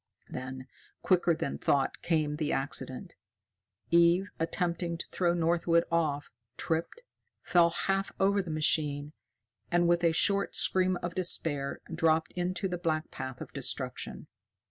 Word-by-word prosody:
Then, 130 Hz, 0 st, -6 dB, 0.4 s
quicker 175 Hz, -2 st, +3 dB
than 140 Hz, -, -4 dB
thought, 135 Hz, -1 st, +1 dB
came 155 Hz, -3 st, 0 dB
the 155 Hz, 0 st, -1 dB
accident. 135 Hz, -2 st, -3 dB, 0.8 s
Eve, 170 Hz, +3 st, +4 dB
attempting 170 Hz, 0 st, -1 dB
to -, -, -4 dB
throw 175 Hz, -2 st, +1 dB
Northwood 170 Hz, 0 st, +2 dB
off, 150 Hz, -4 st, 0 dB, 0.3 s
tripped, 165 Hz, -, -2 dB, 0.4 s
fell 170 Hz, -1 st, +4 dB
half 195 Hz, +3 st, -1 dB
over 200 Hz, +1 st, +3 dB
the 180 Hz, -, -8 dB
machine, 150 Hz, -1 st, 0 dB, 0.6 s
and, 175 Hz, 0 st, +3 dB
with 175 Hz, 0 st, +2 dB
a 170 Hz, -, +5 dB
short 200 Hz, +5 st, +1 dB
scream 185 Hz, -1 st, +3 dB
of 175 Hz, 0 st, -3 dB
despair, 155 Hz, -6 st, 0 dB
dropped 160 Hz, -1 st, +2 dB
into 180 Hz, +2 st, -2 dB
the 180 Hz, -1 st, -4 dB
black 160 Hz, -2 st, -1 dB
path 130 Hz, -1 st, -6 dB
of -, -, -8 dB
destruction. -, -, -3 dB
170 Hz, 135 wpm, -30 LUFS, 155-180 Hz, 0.8 s, a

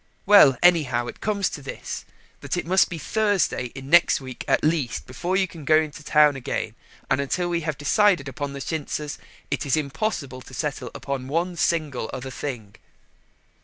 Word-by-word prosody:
Well, 170 Hz, -11 st, +7 dB
anyhow 145 Hz, -9 st, +4 dB
it -, -, -8 dB
comes 200 Hz, -2 st, 0 dB
to 145 Hz, -, -7 dB
this, 135 Hz, -, -6 dB, 0.3 s
that -, -, -3 dB
it -, -, -2 dB
must 185 Hz, +3 st, +4 dB
be 170 Hz, -, -5 dB
Thursday 205 Hz, -4 st, 0 dB
in 135 Hz, 0 st, -8 dB
next 175 Hz, -1 st, +6 dB
week 130 Hz, -2 st, -8 dB
at -, -, +2 dB
least, 155 Hz, -6 st, 0 dB
before 175 Hz, +9 st, -2 dB
you 190 Hz, -1 st, +2 dB
can 165 Hz, -3 st, -11 dB
go 155 Hz, +2 st, +4 dB
to 155 Hz, +1 st, -11 dB
town 150 Hz, -1 st, +4 dB
again, 135 Hz, -, -3 dB, 0.3 s
and 135 Hz, +1 st, +1 dB
until 175 Hz, +6 st, -1 dB
we 170 Hz, -1 st, 0 dB
have 155 Hz, -2 st, -3 dB
decided 170 Hz, 0 st, +3 dB
upon 140 Hz, +2 st, -5 dB
the 140 Hz, -, -6 dB
chintzes 150 Hz, -1 st, -4 dB, 0.3 s
it -, -, -1 dB
is 140 Hz, +1 st, +1 dB
impossible 140 Hz, -, -3 dB
to 130 Hz, +1 st, -12 dB
settle 135 Hz, -5 st, -3 dB
upon 135 Hz, -2 st, -4 dB
one 170 Hz, +5 st, -1 dB
single 155 Hz, -9 st, 0 dB
other 130 Hz, +1 st, -6 dB
thing." 120 Hz, -8 st, -6 dB
150 Hz, 180 wpm, -24 LUFS, 135-175 Hz, 0.3 s, Well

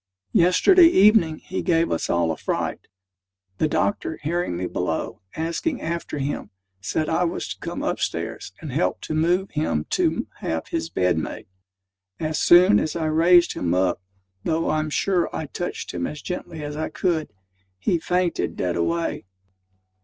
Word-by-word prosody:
Yesterday 330 Hz, -, +6 dB
evening, 200 Hz, -, +5 dB
he 190 Hz, -, -5 dB
gave 165 Hz, -2 st, +2 dB
us 80 Hz, -, -1 dB
all 85 Hz, -1 st, +2 dB
a -, -, -2 dB
fright. -, -, -3 dB, 0.7 s
The 155 Hz, -, +3 dB
doctor 160 Hz, +1 st, -1 dB
hearing 170 Hz, -, -1 dB
me 90 Hz, -, -2 dB
below, 90 Hz, -2 st, -3 dB
asking 170 Hz, -, -2 dB
after 165 Hz, -2 st, -4 dB
him, 140 Hz, +1 st, -3 dB, 0.3 s
said 130 Hz, +10 st, -1 dB
I 165 Hz, +2 st, +1 dB
was 170 Hz, -, -2 dB
to -, -, -6 dB
come -, -, -5 dB
up -, -, -1 dB
stairs -, -, -3 dB
and 155 Hz, -4 st, -6 dB
help 90 Hz, -6 st, 0 dB
to -, -, -4 dB
move 175 Hz, +5 st, +1 dB
him 115 Hz, -, -1 dB
to -, -, +1 dB
have 80 Hz, 0 st, -3 dB
his 80 Hz, -, -2 dB
bed 90 Hz, -1 st, +1 dB
made. -, -, -6 dB, 0.7 s
As 155 Hz, -1 st, -1 dB
soon 175 Hz, -, +7 dB
as 155 Hz, -, -2 dB
I 165 Hz, -2 st, -1 dB
raised 170 Hz, +3 st, +5 dB
him 85 Hz, 0 st, -1 dB
up 90 Hz, -1 st, +1 dB, 0.4 s
(though 165 Hz, +1 st, 0 dB
I'm 155 Hz, 0 st, 0 dB
sure 180 Hz, +3 st, +1 dB
I 160 Hz, -, -3 dB
touched 175 Hz, +4 st, -5 dB
him 85 Hz, -1 st, -2 dB
as 150 Hz, -2 st, -8 dB
gently 170 Hz, -3 st, -5 dB
as 145 Hz, 0 st, -5 dB
I 155 Hz, -, -3 dB
could), 160 Hz, -, -1 dB, 0.5 s
he 165 Hz, -, 0 dB
fainted 180 Hz, +1 st, 0 dB
dead 90 Hz, -1 st, -1 dB
away. 85 Hz, +4 st, -1 dB
155 Hz, 165 wpm, -23 LUFS, -, 0.7 s, soon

